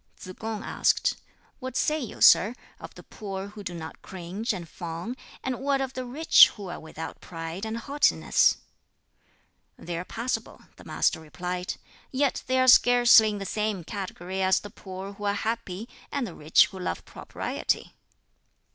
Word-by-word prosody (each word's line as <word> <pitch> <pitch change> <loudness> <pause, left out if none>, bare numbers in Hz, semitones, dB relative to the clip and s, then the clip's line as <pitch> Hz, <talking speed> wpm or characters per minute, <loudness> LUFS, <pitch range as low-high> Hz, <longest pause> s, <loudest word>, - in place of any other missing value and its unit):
Tsz 185 - -9
kung 220 -1 -4
asked, - - +1 0.4
"What 260 -1 -5
say 305 +1 +1
you, 245 - -7
sir, 215 +6 +7 0.2
of - - -10
the - - -12
poor 195 -1 -6
who 205 0 -10
do 175 -2 -5
not 160 -1 -8
cringe 190 +6 -4
and 180 -5 -5
fawn; 170 +8 -6 0.3
and 260 -2 -2
what 275 +1 +1
of 265 -1 -3
the 255 -1 -4
rich 295 +6 +7
who 200 -4 -8
are 175 - -6
without 160 0 -8
pride 165 +4 -6
and 220 +1 -3
haughtiness?" 280 +5 +3 1.2
"They 170 0 -6
are - - -4
passable," 235 +6 -4 0.2
the - - -14
Master - - +1
replied; 180 +3 -4 0.4
"yet 275 +1 +1
they 260 0 +2
are 255 - +3
scarcely 245 -3 +7
in 210 - -3
the 200 - -5
same 210 -2 -2
category 190 0 -5
as 190 0 +3
the 205 - -10
poor 190 +1 -8
who 205 +1 -7
are 200 0 +1
happy, 220 -1 -3 0.2
and 280 -3 -1
the 185 - -7
rich 155 +1 +4
who 190 - -9
love 90 - -4
propriety." - - -3
205 Hz, 170 wpm, -27 LUFS, 180-245 Hz, 1.2 s, sir